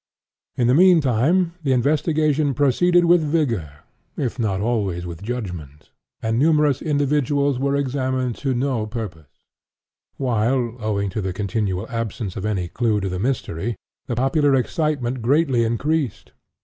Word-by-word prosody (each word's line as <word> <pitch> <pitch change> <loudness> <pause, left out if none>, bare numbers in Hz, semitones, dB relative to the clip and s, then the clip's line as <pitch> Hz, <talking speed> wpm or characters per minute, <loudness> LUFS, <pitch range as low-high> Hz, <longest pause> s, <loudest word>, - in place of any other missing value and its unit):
In 120 - +1
the 125 - +4
mean 180 +3 +6
time 155 +7 +2
the 135 -4 +1
investigation 150 +1 +1
proceeded 175 +6 +3
with 175 0 +5
vigor, 115 - -1 0.4
if 125 -2 -3
not 100 -5 0
always 100 -6 -1
with 85 -2 -7
judgment, 90 - -6 0.3
and 110 +1 0
numerous 150 -2 +3
individuals 145 -2 +1
were 140 +1 0
examined 130 -2 -1
to 135 -3 -1
no 120 -4 -1
purpose; 100 - -7 0.9
while, 120 -1 0
owing 100 -3 -1
to 105 - -3
the 95 -1 -3
continual 100 0 -2
absence 115 -4 -4
of 100 - -3
all 95 -4 -1
clue 110 0 0
to 95 -1 -2
the 90 0 -3
mystery, 115 -3 -2 0.3
the 120 - -2
popular 135 +3 +2
excitement 130 -3 -1
greatly 135 0 +2
increased. 130 +3 -1
125 Hz, 140 wpm, -22 LUFS, 105-145 Hz, 0.9 s, mean